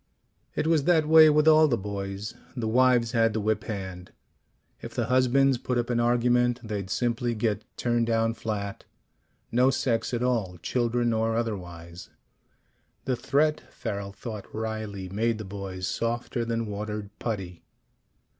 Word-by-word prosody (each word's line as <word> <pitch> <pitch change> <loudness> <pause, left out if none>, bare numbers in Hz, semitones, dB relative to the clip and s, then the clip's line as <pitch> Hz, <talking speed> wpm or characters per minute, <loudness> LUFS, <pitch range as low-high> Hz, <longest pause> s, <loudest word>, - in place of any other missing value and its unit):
It - - 0
was 160 -3 +2
that 160 -4 +3
way 160 0 +8
with 150 +1 +3
all 155 0 +7
the 120 -5 +1
boys. 100 +1 -5 0.2
The 115 -2 -1
wives 120 0 +3
had 115 -1 +2
the 110 - -1
whip 105 0 0
hand. 95 -4 -6 0.7
If - - -8
the 120 - 0
husbands 130 +1 +3
put 125 0 -2
up 120 0 -1
an 120 - +1
argument, 120 +1 +2
they'd 105 -4 -4
simply 120 +1 0
get 110 -1 -1
turned 120 -1 +1
down 115 0 +1
flat: 105 -3 -4 0.7
no 125 +3 +4
sex 120 -3 0
at 120 -1 -1
all, 110 -8 0
children 120 -1 +1
or 110 0 +1
otherwise. 90 -6 -5 1.0
The 130 -2 +1
threat, 150 +5 +1
Farrel 100 -1 -5
thought 105 +1 -7
wryly, 110 -3 -4
made 110 +4 0
the 110 - -6
boys 95 -1 -5
softer 120 +2 -2
than 115 0 -1
watered 105 0 -5
putty. 95 -6 -4
115 Hz, 150 wpm, -27 LUFS, 100-125 Hz, 1.0 s, way